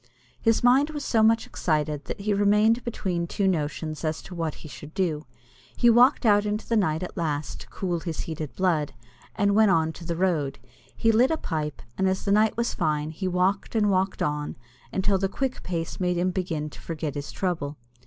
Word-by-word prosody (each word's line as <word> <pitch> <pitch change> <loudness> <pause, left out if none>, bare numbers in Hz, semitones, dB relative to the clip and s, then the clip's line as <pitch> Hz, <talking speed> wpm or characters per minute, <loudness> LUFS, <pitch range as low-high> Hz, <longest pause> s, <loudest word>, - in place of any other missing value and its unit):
His 225 0 +2
mind 265 +5 +5
was 295 -2 -5
so 225 - +2
much 225 +1 +4
excited 150 -3 -1
that - - -5
he 205 +1 0
remained 210 +4 +3
between 180 -7 -2
two 195 +3 0
notions 155 -2 -2
as 155 0 -2
to 180 - -10
what 165 -3 -3
he - - -6
should 150 +2 -11
do. 160 -6 -1 0.5
He 240 - +5
walked 250 +3 +5
out 205 -2 +5
into 210 +1 -3
the 230 - +1
night 160 -6 +1
at 180 - -6
last 155 -3 -2
to - - -11
cool 175 -3 -2
his 165 -2 -4
heated 155 -3 -6
blood, 165 -8 0 0.4
and 200 0 +2
went 215 0 +5
on 160 -2 +2
to 170 - -11
the 170 0 -3
road. 160 -6 0 0.4
He 225 - +3
lit 240 +4 +4
a 320 - +1
pipe, 155 - -4 0.2
and 190 - +3
as 190 - -2
the 200 - +1
night 215 +2 +3
was 235 0 0
fine 155 -2 -1
he 185 +4 -4
walked 185 +4 0
and 210 -2 +3
walked 190 0 0
on, 150 0 -2 0.4
until 195 0 +1
the 195 0 0
quick 265 +5 -3
pace 165 -2 -4
made 180 -1 0
him 180 +1 +1
begin 165 -5 -3
to - - -12
forget 155 -3 -4
his 145 0 -5
trouble. 160 -6 -2
180 Hz, 210 wpm, -26 LUFS, 155-210 Hz, 0.5 s, mind